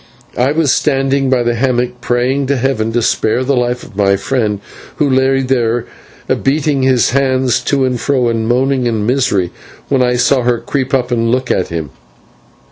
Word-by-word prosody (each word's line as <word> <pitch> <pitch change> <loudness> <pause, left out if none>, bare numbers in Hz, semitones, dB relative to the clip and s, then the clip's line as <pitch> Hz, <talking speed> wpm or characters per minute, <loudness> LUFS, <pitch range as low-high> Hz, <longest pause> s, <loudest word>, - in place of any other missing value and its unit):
I 125 +3 +1
was 155 -3 +2
standing 135 -1 +1
by 130 -2 +2
the 120 0 0
hammock 125 0 -1
praying 130 +3 0
to 140 0 +1
heaven 120 -3 -1
to 120 0 +1
spare 120 +1 +1
the 140 +1 0
life 125 0 -1
of 115 - -14
my 100 -1 +2
friend, 105 0 -1 0.4
who 150 - +1
lay 135 0 +2
there 120 -3 0 0.6
beating 145 0 +1
his 130 -3 +2
hands 130 -2 +1
to 135 0 +1
and 125 -2 -1
fro 130 -4 +1
and 115 -1 -1
moaning 130 +1 +1
in 110 -3 -1
misery, 110 -8 0 0.4
when 135 -2 +2
I 125 0 +2
saw 125 +2 +2
her 120 0 +1
creep 130 +3 -3
up 125 -1 -1
and 115 -1 +1
look 130 +1 0
at 95 - 0
him. 80 -5 -5
125 Hz, 185 wpm, -14 LUFS, 120-135 Hz, 0.6 s, was